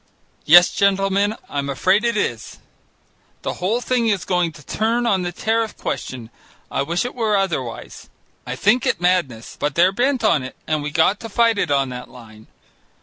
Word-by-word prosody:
"Yes, 175 +3 +7
gentlemen, 200 +1 +1
I'm 140 -1 -3
afraid 185 - +2
it 235 -2 0
is. 120 - -3 0.9
The - - -2
whole 215 +7 0
thing 245 -2 0
is 200 -4 0
going 180 -3 0
to 150 -1 -15
turn 230 +3 0
on 195 -5 +2
the 175 -1 -3
tariff 225 +4 -1
question. 120 -3 -5 0.4
I - - -1
wish 170 +9 -1
it 245 - -4
were 220 -4 0
otherwise. 155 -12 -4 0.3
I 125 - -5
think 215 - +2
it 190 - 0
madness, 175 -11 -1
but 145 -1 -2
they're 180 +2 +4
bent 250 +4 0
on 165 -9 +3
it, 130 0 -8
and 155 -1 -1
we 150 - -3
got 160 +7 +2
to 225 - -8
fight 230 0 +2
it 180 - 0
on 140 -2 +1
that 125 0 -8
line. 110 -3 -15
185 Hz, 185 wpm, -20 LUFS, 140-220 Hz, 0.9 s, Yes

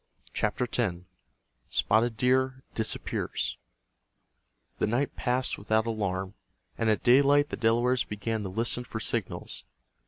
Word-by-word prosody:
CHAPTER 105 +4 0
X—SPOTTED 95 - -2
DEER 130 +1 +2
DISAPPEARS 110 -1 -1 1.2
The - - +2
night 120 +6 0
passed 125 +1 0
without 110 +2 +1
alarm, 95 -4 -2 0.4
and 115 - 0
at 105 - +1
daylight 140 +3 +5
the - - -3
Delawares 120 +2 +2
began 110 +1 -3
to 100 - -4
listen 115 +5 -1
for 115 -2 -6
signals. 110 -2 -2
115 Hz, 115 wpm, -28 LUFS, 105-125 Hz, 1.2 s, daylight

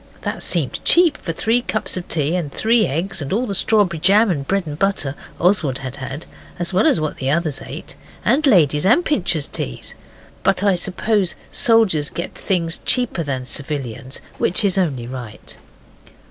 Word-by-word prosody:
This - - -2
seemed - - 0
cheap 340 -3 +4
for - - -17
the 160 - -11
three 230 +3 +2
cups 215 -4 -3
of 180 -1 -6
tea 155 +1 0
and 170 -5 -2
the - - -16
three 225 0 +3
eggs 170 +5 -1
and 140 - -5
all 230 +6 +1
the 205 - -3
strawberry 195 -4 +2
jam 205 +5 +4
and 140 -5 -3
bread 195 -2 0
and 150 0 -7
butter 195 -9 0 0.3
Oswald 165 -8 +2
had 130 0 -6
had, 135 +4 -6 0.3
as 175 +1 0
well 190 +4 +3
as - - +3
what 155 -1 -3
the 130 - -2
others 155 -2 0
ate, 140 +5 -6 0.3
and 280 +7 +3
Lady's 150 - +4
and 245 - +4
Pincher's 175 - 0
teas, - - -5 0.5
but 185 - +1
I 200 -1 +4
suppose 190 +2 0 0.2
soldiers 215 -11 +3
get 170 - -5
things 170 -4 -1
cheaper 245 -8 +1
than 135 -4 -3
civilians, 135 -1 -3 0.2
which 195 +4 +2
is 190 - +2
only 145 -11 0
right. 120 -4 -9
175 Hz, 185 wpm, -20 LUFS, 145-205 Hz, 0.5 s, cheap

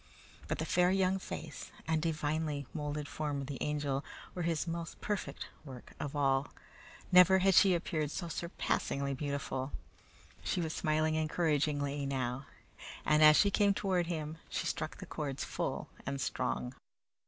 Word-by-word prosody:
But - - -1
the 160 - -2
fair 180 +2 +4
young 190 0 +2
face 160 -4 -7 0.2
and 160 -1 +2
divinely 155 -2 -1
molded 150 -1 -3
form 145 -2 -2
of - - -4
the 135 -1 -5
Angel 145 -2 -1 0.3
were 180 - -4
His 165 -2 0
most 170 -1 -4
perfect 210 -2 -3 0.2
work 130 -5 -10
of 145 0 -4
all. 135 -1 +2 0.6
Never 180 +1 +8
had 190 +1 +4
she 190 +1 +7
appeared 160 -3 -1
so 170 +3 -4
surpassingly 140 -4 -1
beautiful. 140 -1 -3 0.7
She - - 0
was 160 -2 -1
smiling 155 0 +1
encouragingly 145 -3 +1
now, 130 -1 -2 0.6
and 150 0 +4
as 155 0 +9
she 200 - +5
came 200 0 +4
toward 185 -4 +1
him, 160 -2 -3
she - - -2
struck 155 0 -2
the - - -8
chords 140 -3 -3
full - - -3 0.2
and 140 0 -3
strong. 60 - -1
155 Hz, 155 wpm, -33 LUFS, 140-170 Hz, 0.7 s, as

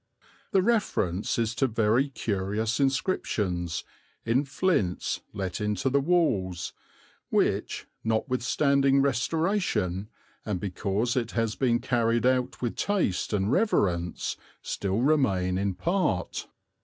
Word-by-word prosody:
The 190 -4 +3
reference 185 - 0
is 115 -1 0
to 125 +3 +1
very 115 +4 +2
curious 110 0 -1
inscriptions, 95 - 0 0.4
in 125 +5 +2
flints 135 - 0
let 95 -2 -4
into 105 +5 0
the 140 - +4
walls, 120 - +1 0.6
which, - - 0 0.2
notwithstanding 135 +4 +2
restoration 135 - 0 0.3
and 105 -4 -2
because 100 +5 -1
it 120 -3 -1
has 115 -2 0
been 120 -3 +2
carried 120 -1 +1
out 130 0 +1
with 120 - -2
taste 185 - 0
and 105 0 +1
reverence, 90 - +1 0.3
still 100 +3 -1
remain 95 -11 +2
in 100 -1 -1
part. 170 - -1
115 Hz, 110 wpm, -27 LUFS, 95-135 Hz, 0.6 s, the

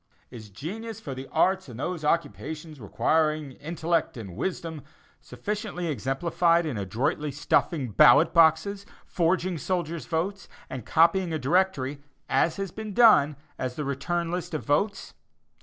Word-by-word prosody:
"Is 110 -4 -10
genius 200 - -7
for 145 -11 -6
the 130 +1 -7
arts 190 -4 +1
and 120 0 -9
those 175 +2 -3
occupations 155 0 -2
requiring 155 +6 0
intellect 160 +1 -2
and 100 -6 -8
wisdom" 165 - -4 0.4
sufficiently 205 -4 -5
exemplified 165 +5 +1
in 150 -6 -3
adroitly 125 - -1
stuffing 140 -1 0
ballot 120 +5 +6
boxes, 170 +5 +4 0.2
forging 175 0 0
soldiers' 170 0 -3
votes, 180 +4 -2 0.2
and 130 -4 -6
copying 170 +2 +3
a - - 0
directory, 145 -3 0 0.3
as 145 +5 +2
has 195 -2 -4
been 215 -2 -7
done, 185 -12 +6 0.2
as 125 -1 -3
the 150 - -3
return 170 +5 -2
list 175 -2 -3
of 155 - -4
votes? 200 +9 0
160 Hz, 140 wpm, -26 LUFS, 140-180 Hz, 0.4 s, ballot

